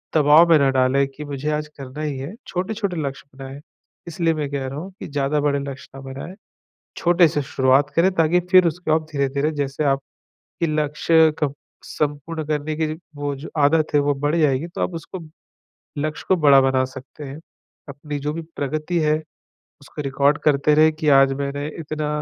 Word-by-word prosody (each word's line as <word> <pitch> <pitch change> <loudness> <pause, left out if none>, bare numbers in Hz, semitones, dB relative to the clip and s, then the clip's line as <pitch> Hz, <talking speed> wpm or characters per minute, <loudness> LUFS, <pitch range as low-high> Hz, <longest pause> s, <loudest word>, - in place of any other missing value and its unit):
दबाव 155 +3 +6
में 165 - +7
ना 140 -1 +3
डालें 135 +1 +2
कि 145 +2 -9
मुझे 145 +1 -4
आज 150 0 -2
करना 135 +2 -8
ही 150 -3 -3
हैं। 140 +10 -6
छोटे-छोटे 195 0 -3
लक्ष्य 140 -1 -5
बनाएँ, 135 +1 -8 0.5
इसलिए 165 0 0
मैं 150 -2 -3
कह 140 -2 -3
रहा 135 +2 -5
हूँ 185 +5 -8
कि - - -7
ज़्यादा 145 0 0
बड़े 145 -1 +1
लक्ष्य 140 -1 -7
ना 135 - -9
बनाएँ। 135 +7 -8 0.6
छोटे 175 0 +4
से 150 -1 -1
शुरुआत 135 +1 +2
करें, 180 +3 +4
ताकि 165 +1 +3
फ़िर 185 -2 +7
उसको 170 0 -2
आप 160 - 0
धीरे-धीरे 140 +1 0
जैसे 145 -1 -3
आपके 135 -1 -3 0.4
लक्ष्य 155 +1 +3
क 145 -2 +1 0.3
संपूर्ण 150 +2 -3
करने 150 0 -2
की 160 0 0
ज - - -13 0.2
वो 145 0 -3
जो 140 +4 -9
आदत 150 +2 +3
हैं 145 - +5
वो 145 0 +2
बढ़ 145 +3 -1
जाएगी, 150 -2 +2
तो 175 - -8
आप 180 - -2
उसको 165 +3 -7 0.8
लक्ष्य 155 +1 -3
को 190 - +4
बड़ा 140 -3 +6
बना 130 -1 +2
सकते 130 +3 -11
हैं। 140 +2 -8 0.5
अपनी 145 +1 -6
जो 150 +2 -3
भी 165 - -4 0.2
प्रगति 155 +5 -2
है, 155 -1 +2 0.7
उसको 145 +2 -8
रिकॉर्ड 140 +1 +2
करते 150 0 +3
रहे 155 +1 +5
कि 155 0 -4
आज 135 -1 +6
मैंने 140 +1 -3
इतना 155 -1 -4
150 Hz, 190 wpm, -22 LUFS, 140-155 Hz, 0.8 s, में